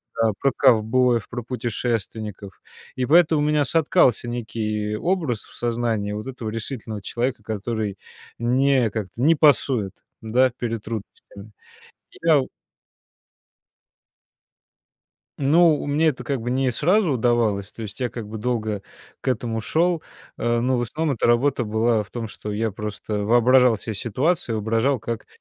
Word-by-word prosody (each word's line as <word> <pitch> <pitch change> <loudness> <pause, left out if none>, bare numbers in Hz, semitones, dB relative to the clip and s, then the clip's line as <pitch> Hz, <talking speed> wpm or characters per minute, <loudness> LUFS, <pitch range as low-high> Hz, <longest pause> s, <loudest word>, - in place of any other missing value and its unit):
да, 115 -1 +2
про 135 - +2
ковбоев, 120 -2 +3
про 120 0 -5
путешественников. 110 -4 -4 0.4
И 130 -1 -1
поэтому 160 +1 +4
у - - +1
меня 150 -1 +2
соткался 145 -5 +2
некий 110 -3 -3
образ 160 - -1
в - - -17
сознании 115 -3 -1
вот 105 +1 -5
этого 125 -4 -5
решительного 110 -2 -5
человека, 120 -2 -2
который 110 -1 -3 0.4
не 130 +1 +2
как-то 110 +1 -5
не 160 +5 +5
пасует, 135 - +3 0.3
да, 125 +4 +3
перед 115 -2 -4
трудностями. 105 -1 -8 0.7
Я 160 -4 +4
в 130 - -6 2.9
Ну, 155 +3 +4
мне 145 +3 +2
это 140 - -2
как 140 -3 -2
бы 120 +2 -3
не 130 0 +1
сразу 175 - +2
удавалось, 115 -5 +1
то 115 - -9
есть 105 -1 -8
я 125 -2 -1
как 115 -3 -7
бы 110 +1 -6
долго 110 -3 -2 0.4
к - - -12
этому 115 -3 -1
шел, 170 +8 +1 0.4
э, 120 0 +1
но 125 +1 +1
в - - 0
основном 145 +4 -2
эта - - +1
работа 120 +2 +2
была 110 0 +1
в 100 - -22
том, 115 -2 -4
что 105 0 -7
я 110 +1 -1
просто 105 0 -4
воображал 120 +2 +5
се 110 +2 -6
ситуацию, 125 - -1
воображал, 115 +4 +1
как 115 0 -5
120 Hz, 145 wpm, -23 LUFS, 110-130 Hz, 2.9 s, не